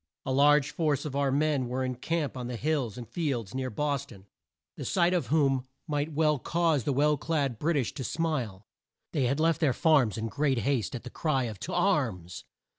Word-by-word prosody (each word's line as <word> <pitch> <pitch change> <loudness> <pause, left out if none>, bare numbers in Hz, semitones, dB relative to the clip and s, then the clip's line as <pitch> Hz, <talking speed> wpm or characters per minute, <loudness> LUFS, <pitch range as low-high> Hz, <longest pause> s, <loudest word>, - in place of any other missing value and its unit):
A 130 - -2
large 145 +1 +4
force 150 -2 0
of 140 -3 -4
our 140 -1 +1
men 145 -2 +1
were 130 +2 -2
in 130 - -2
camp 150 +4 -2
on 125 -1 -4
the 125 - -4
hills 130 -4 -1
and 120 -2 -7
fields 130 - -2
near 130 0 -2
Bos 140 +3 -1
ton, 95 -7 -14 0.5
the - - -6
sight 175 -1 +2
of 180 - 0
whom 135 -4 +2 0.2
might 150 -1 -2
well 150 -1 +2
cause 165 -3 +1
the - - +1
well 150 +2 +3
clad 140 -6 -1
Brit 165 0 +1
ish 130 -5 -1
to 135 - -5
smile. 125 - -2 0.5
They 140 -5 +1
had 135 +4 0
left 165 0 +2
their 145 -5 +3
farms 140 -10 +3
in 110 - -2
great 135 +4 0
haste 120 -5 0
at 120 - -6
the 125 - -8
cry 145 -5 0
of 110 -5 -5
"To - - -5
arms!" 115 - 0
140 Hz, 210 wpm, -29 LUFS, 125-155 Hz, 0.5 s, large